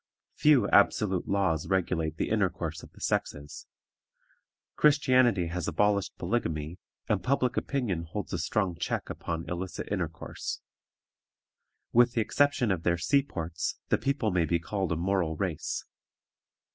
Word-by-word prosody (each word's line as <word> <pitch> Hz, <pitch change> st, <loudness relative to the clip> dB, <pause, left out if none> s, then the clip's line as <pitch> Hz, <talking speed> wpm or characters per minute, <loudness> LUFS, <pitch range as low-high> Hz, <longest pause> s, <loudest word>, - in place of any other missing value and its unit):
Few 140 Hz, -9 st, +4 dB
absolute 100 Hz, -3 st, +3 dB
laws 85 Hz, -6 st, +1 dB
regulate 85 Hz, -4 st, 0 dB
the -, -, -1 dB
intercourse 90 Hz, -7 st, -1 dB
of -, -, -13 dB
the -, -, -18 dB
sexes. 75 Hz, 0 st, -3 dB, 1.1 s
Christianity 130 Hz, -, +4 dB
has 90 Hz, 0 st, -3 dB
abolished 105 Hz, -1 st, +1 dB
polygamy, 80 Hz, -8 st, -2 dB, 0.3 s
and -, -, +1 dB
public 130 Hz, -1 st, +1 dB
opinion 105 Hz, -12 st, -1 dB
holds 100 Hz, +6 st, -5 dB
a 85 Hz, -, -1 dB
strong 95 Hz, +1 st, 0 dB
check 85 Hz, -, -3 dB
upon 85 Hz, -1 st, -4 dB
illicit 90 Hz, +1 st, -4 dB
intercourse. 85 Hz, -5 st, -4 dB, 1.3 s
With 120 Hz, 0 st, +5 dB
the 115 Hz, -, +2 dB
exception 145 Hz, -1 st, +2 dB
of 90 Hz, -3 st, 0 dB
their 85 Hz, 0 st, +1 dB
sea 140 Hz, -, +3 dB
ports, 85 Hz, -, -4 dB
the -, -, +3 dB
people 135 Hz, -6 st, 0 dB
may 90 Hz, -2 st, +2 dB
be 85 Hz, -, +1 dB
called 95 Hz, +2 st, -3 dB
a -, -, +2 dB
moral 85 Hz, -1 st, 0 dB
race. 90 Hz, -3 st, -3 dB
95 Hz, 135 wpm, -29 LUFS, 85-115 Hz, 1.3 s, With